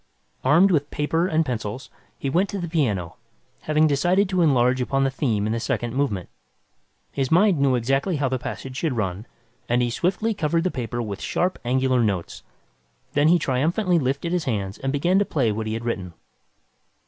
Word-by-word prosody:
Armed 165 +9 +5
with 145 -3 +1
paper 160 +4 0
and 160 -2 +1
pencils, 120 -1 -5 0.3
he - - -4
went 175 +9 +1
to 200 - -4
the 175 -2 -3
piano, 110 - -1 0.4
having 155 0 +2
decided 175 +7 +2
to 185 -1 0
enlarge 130 -4 +3
upon 135 +2 0
the 135 - +1
theme 115 -7 0
in 110 - -1
the 115 - -1
second 120 0 -2
movement. 130 -10 -1 0.8
His 135 -2 -1
mind 180 -1 +4
knew 135 -2 +3
exactly 135 +8 0
how 140 -2 0
the 130 0 -1
passage 130 +1 -6
should 160 -3 -1
run, 100 +1 -3 0.4
and 120 +1 +2
he 120 - -1
swiftly 195 - 0
covered 165 -3 0
the 185 - 0
paper 120 -1 -3
with 100 -3 -6
sharp, 180 +1 -1
angular 130 0 +2
notes. 95 -6 -2 0.7
Then 145 +1 +3
he 175 +2 +6
triumphantly 170 +6 +1
lifted 140 +5 -1
his 175 -3 -1
hands 100 -5 -3
and 135 - -2
began 175 +7 +2
to - - +3
play 135 - 0
what 110 +1 -3
he 110 - -2
had 115 +1 -5
written. 95 -7 -3
135 Hz, 190 wpm, -23 LUFS, 120-165 Hz, 0.8 s, he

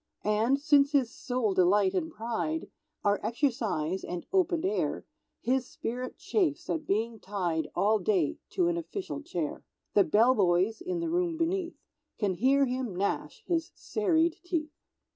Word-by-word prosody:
And, 220 +6 +2
since 290 -1 +4
his 260 -4 +2
sole 245 -6 -1
delight 190 +2 +4
and 320 -3 -1
pride 240 +7 -3 0.3
Are 205 -1 +2
exercise 215 - -1
and 180 -1 -5
open 360 -2 +2
air, 410 +2 -1 0.4
His 255 0 +1
spirit 250 +2 -5
chafes 360 -4 0
at 310 -2 -3
being 225 +2 0
tied 175 -7 -2
All 215 +2 +3
day 180 -6 +1
to 360 -3 +2
an 345 0 +1
official 340 -2 -5
chair; 170 - -4 0.3
The 200 - +6
bell 220 +9 +4
boys 190 - +2
(in 360 -1 -2
the 335 - -1
room 345 -1 0
beneath) 345 +1 -1 0.4
Can 205 -3 +1
hear 270 +8 +3
him 250 -5 -3
gnash 200 - -2
his 335 -1 -1
serried 340 -6 +1
teeth. 315 -4 -2
255 Hz, 150 wpm, -29 LUFS, 205-330 Hz, 0.4 s, The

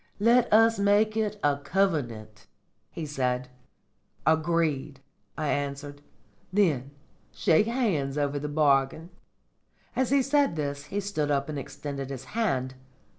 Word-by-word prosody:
"Let 235 +3 +4
us 225 0 +5
make 205 +2 +3
it 210 -1 -1
a 145 -1 +3
covenant," 130 - -2 0.4
he 165 - -6
said. 125 -3 -2 0.8
"Agreed!" 160 -3 +1 0.4
I 150 - -1
answered. 145 0 -3 0.5
"Then 160 -10 +2 0.4
shake 180 +3 +3
hands 185 - 0
over 145 0 0
the 150 +1 -4
bargain." 145 +2 +1 0.8
As 260 -2 +1
he 275 0 +3
said 280 - +2
this 145 -1 -3
he 200 +7 -3
stood 175 -7 -2
up 140 0 0
and 150 -2 -3
extended 140 0 -6
his 135 -1 -6
hand. 135 - 0
150 Hz, 125 wpm, -27 LUFS, 140-205 Hz, 0.8 s, us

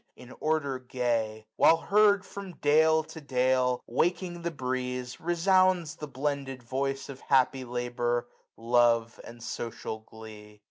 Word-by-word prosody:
In 125 0 -13
order 150 -4 0
gay. 115 -4 -2
While 165 - +6
heard 205 +2 +3
from 200 -2 -8
dale 160 +2 +4
to 160 +1 -11
dale, 130 -2 +1
Waking 175 +6 -1
the 170 - -1
breeze, 125 -3 -4
resounds 175 -1 +2
the 150 - -6
blended 135 -2 -3
voice 135 +3 -2
Of 135 -1 -9
happy 130 -1 +2
labour, 120 -1 -2 0.3
love, 115 -1 +2
and 115 0 -11
social 115 -1 -5
glee. 110 -1 -13
130 Hz, 130 wpm, -28 LUFS, 120-160 Hz, 0.3 s, While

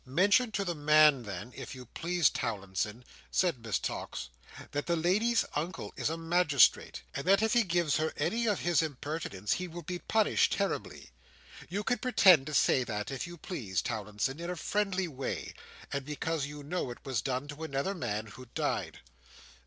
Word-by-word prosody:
"Mention 200 - +3
to 200 0 0
the 175 - -1
man, 150 -2 +5
then, 105 +2 -7
if - - -7
you 125 -1 -9
please, 170 +7 +1
Towlinson," 105 +2 -3 0.2
said 165 -11 +1
Miss 115 -3 0
Tox, - - -4 0.4
"that 145 0 -3
the 170 - +2
lady's 205 +8 +2
uncle 165 +5 -3
is - - -1
a 165 - -3
magistrate, 165 -5 +3
and 140 - -3
that 195 +3 +5
if 220 - +2
he 240 - +5
gives 170 -6 +1
her 155 0 0
any 235 +1 0
of 205 -3 +1
his 175 -2 +3
impertinence 145 - -3
he 180 - -3
will 175 0 -8
be 180 +3 -4
punished 220 +2 +2
terribly. 200 - -3 0.6
You 200 +4 -2
can 245 +2 0
pretend 190 - +6
to 155 - -5
say 130 - +4
that, 105 0 -4
if 135 +6 -4
you 175 0 -9
please, 115 - -3
Towlinson, 110 +5 -2
in 170 +1 -4
a 180 - -2
friendly 190 +2 0
way, 135 -4 -4 0.4
and 140 0 -1
because 150 +1 -2
you 145 0 -8
know 160 -1 -2
it 120 - -10
was 130 -6 -1
done 130 +3 -2
to 150 +2 -7
another 150 +5 -1
man, 110 - -3
who 120 +4 -11
died." - - -2
155 Hz, 185 wpm, -31 LUFS, 130-180 Hz, 0.6 s, pretend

